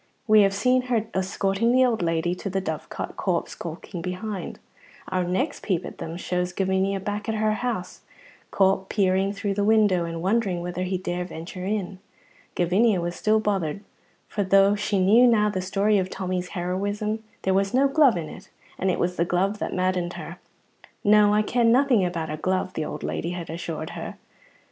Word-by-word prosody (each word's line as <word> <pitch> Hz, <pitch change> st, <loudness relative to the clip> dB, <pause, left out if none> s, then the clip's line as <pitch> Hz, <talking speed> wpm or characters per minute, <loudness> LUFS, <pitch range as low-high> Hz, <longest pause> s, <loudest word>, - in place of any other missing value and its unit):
We 215 Hz, -1 st, +6 dB
have 195 Hz, -1 st, +4 dB
seen 250 Hz, +5 st, +3 dB
her 230 Hz, -3 st, +1 dB
escorting 195 Hz, +4 st, 0 dB
the 255 Hz, +1 st, +5 dB
old 235 Hz, -5 st, 0 dB
lady 165 Hz, 0 st, 0 dB
to 190 Hz, +2 st, -5 dB
the 195 Hz, +1 st, -1 dB
Dovecot, 160 Hz, -5 st, -5 dB
Corp 180 Hz, -3 st, 0 dB
skulking 170 Hz, +2 st, -7 dB
behind. 185 Hz, +3 st, -5 dB, 0.5 s
Our 185 Hz, -1 st, 0 dB
next 220 Hz, -, -1 dB
peep 185 Hz, -3 st, -1 dB
at -, -, -9 dB
them 165 Hz, +1 st, -5 dB
shows 180 Hz, 0 st, -2 dB
Gavinia 190 Hz, +1 st, 0 dB
back 210 Hz, +2 st, -4 dB
at 220 Hz, -, 0 dB
her 215 Hz, 0 st, +1 dB
house, 220 Hz, -4 st, -4 dB, 0.5 s
Corp 190 Hz, 0 st, +2 dB
peering 195 Hz, -1 st, +2 dB
through 200 Hz, 0 st, -2 dB
the 200 Hz, +1 st, 0 dB
window 205 Hz, -5 st, +3 dB
and 165 Hz, 0 st, -5 dB
wondering 195 Hz, -2 st, +1 dB
whether 180 Hz, 0 st, -4 dB
he 185 Hz, 0 st, -1 dB
dare 180 Hz, -1 st, -3 dB
venture 180 Hz, +1 st, -7 dB
in. 195 Hz, -2 st, -3 dB, 0.6 s
Gavinia 190 Hz, +4 st, +3 dB
was 175 Hz, 0 st, -3 dB
still 215 Hz, +1 st, +2 dB
bothered, 200 Hz, -4 st, -1 dB, 0.4 s
for 205 Hz, -, -2 dB
though 195 Hz, +1 st, +5 dB
she 210 Hz, 0 st, -1 dB
knew 215 Hz, +7 st, +6 dB
now 210 Hz, -3 st, +4 dB
the 185 Hz, -, -2 dB
story 200 Hz, +2 st, +2 dB
of 185 Hz, 0 st, -2 dB
Tommy's 185 Hz, -1 st, -3 dB
heroism, 205 Hz, +5 st, -2 dB, 0.2 s
there 190 Hz, -, +2 dB
was 195 Hz, +1 st, +1 dB
no 270 Hz, +2 st, +4 dB
glove 275 Hz, -, +4 dB
in 160 Hz, -2 st, -4 dB
it, -, -, -11 dB, 0.3 s
and 190 Hz, -, +1 dB
it 180 Hz, -, +1 dB
was 180 Hz, +1 st, -1 dB
the 170 Hz, -, +3 dB
glove 190 Hz, +4 st, 0 dB
that -, -, -3 dB
maddened 185 Hz, -1 st, 0 dB
her. -, -, -8 dB, 0.6 s
"No, 210 Hz, 0 st, +5 dB
I 210 Hz, +1 st, +3 dB
ken 235 Hz, +1 st, +2 dB
nothing 250 Hz, -4 st, +4 dB
about 170 Hz, -3 st, -2 dB
a 155 Hz, -, -3 dB
glove," 185 Hz, +3 st, -1 dB
the 155 Hz, -, -2 dB
old -, -, -6 dB
lady 170 Hz, +2 st, -3 dB
had 170 Hz, -2 st, -6 dB
assured 165 Hz, -1 st, -5 dB
her. -, -, -6 dB
190 Hz, 190 wpm, -25 LUFS, 180-210 Hz, 0.6 s, We